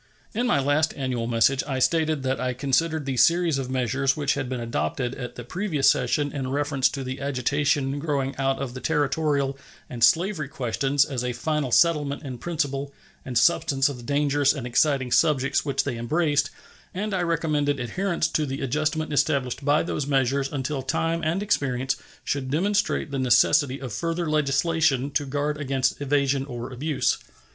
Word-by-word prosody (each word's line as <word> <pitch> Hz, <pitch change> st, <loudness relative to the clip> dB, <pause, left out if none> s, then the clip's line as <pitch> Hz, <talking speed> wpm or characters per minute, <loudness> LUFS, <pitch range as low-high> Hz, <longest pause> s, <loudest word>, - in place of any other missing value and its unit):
In 240 Hz, +3 st, 0 dB
my 245 Hz, -, +3 dB
last 145 Hz, +3 st, +1 dB
annual 125 Hz, -4 st, -2 dB
message 120 Hz, +3 st, +2 dB
I 135 Hz, -2 st, -2 dB
stated 155 Hz, +1 st, +1 dB
that 130 Hz, -2 st, -1 dB
I 125 Hz, -1 st, -1 dB
considered 150 Hz, +4 st, 0 dB
the 135 Hz, -2 st, -2 dB
series 170 Hz, -1 st, +3 dB
of 130 Hz, -1 st, -4 dB
measures 130 Hz, +2 st, 0 dB
which 145 Hz, -2 st, +1 dB
had 135 Hz, -3 st, -3 dB
been 130 Hz, -1 st, -3 dB
adopted 115 Hz, -, -2 dB
at 125 Hz, -2 st, -7 dB
the 120 Hz, -, -7 dB
previous 160 Hz, -, +2 dB
session 140 Hz, +3 st, 0 dB
in 135 Hz, -3 st, -4 dB
reference 140 Hz, -1 st, +1 dB
to 135 Hz, 0 st, -5 dB
the 130 Hz, +1 st, -5 dB
agitation 140 Hz, +1 st, 0 dB
growing 140 Hz, -3 st, -1 dB
out 135 Hz, 0 st, 0 dB
of 135 Hz, -3 st, -4 dB
the 130 Hz, -, -6 dB
Territorial 145 Hz, -2 st, 0 dB, 0.3 s
and 120 Hz, -2 st, -2 dB
slavery 170 Hz, -3 st, +3 dB
questions 135 Hz, +2 st, 0 dB
as 130 Hz, -3 st, -3 dB
a 125 Hz, 0 st, -2 dB
final 150 Hz, -2 st, -2 dB
settlement 150 Hz, -2 st, +2 dB
in 130 Hz, -4 st, -6 dB
principle 145 Hz, -4 st, -2 dB, 0.3 s
and 125 Hz, -2 st, -3 dB
substance 135 Hz, 0 st, +3 dB
of 140 Hz, -, -6 dB
the -, -, -10 dB
dangerous 145 Hz, +1 st, +2 dB
and 135 Hz, -5 st, -6 dB
exciting 130 Hz, +1 st, +1 dB
subjects 140 Hz, -3 st, +2 dB
which 140 Hz, -2 st, 0 dB
they 135 Hz, -4 st, -3 dB
embraced, 145 Hz, +2 st, +1 dB, 0.5 s
and 205 Hz, +2 st, -2 dB
I 185 Hz, -, 0 dB
recommended 150 Hz, -4 st, 0 dB
adherence 170 Hz, +6 st, -1 dB
to 155 Hz, -1 st, 0 dB
the 135 Hz, +1 st, -4 dB
adjustment 155 Hz, +3 st, -1 dB
established 140 Hz, -2 st, 0 dB
by 145 Hz, +2 st, +3 dB
those 150 Hz, -4 st, -3 dB
measures 135 Hz, 0 st, +1 dB
until 135 Hz, 0 st, -2 dB
time 165 Hz, +5 st, -1 dB
and 170 Hz, +6 st, 0 dB
experience 130 Hz, -8 st, 0 dB, 0.3 s
should 135 Hz, -2 st, -2 dB
demonstrate 180 Hz, 0 st, 0 dB
the 135 Hz, -, -2 dB
necessity 135 Hz, +2 st, +3 dB
of 130 Hz, -5 st, -6 dB
further 165 Hz, -, -2 dB
legislation 150 Hz, -1 st, +1 dB
to 145 Hz, 0 st, -1 dB
guard 145 Hz, +2 st, -2 dB
against 135 Hz, -1 st, 0 dB
evasion 140 Hz, -1 st, +1 dB
or 120 Hz, -1 st, -6 dB
abuse. 145 Hz, +3 st, 0 dB
140 Hz, 175 wpm, -25 LUFS, 130-155 Hz, 0.5 s, my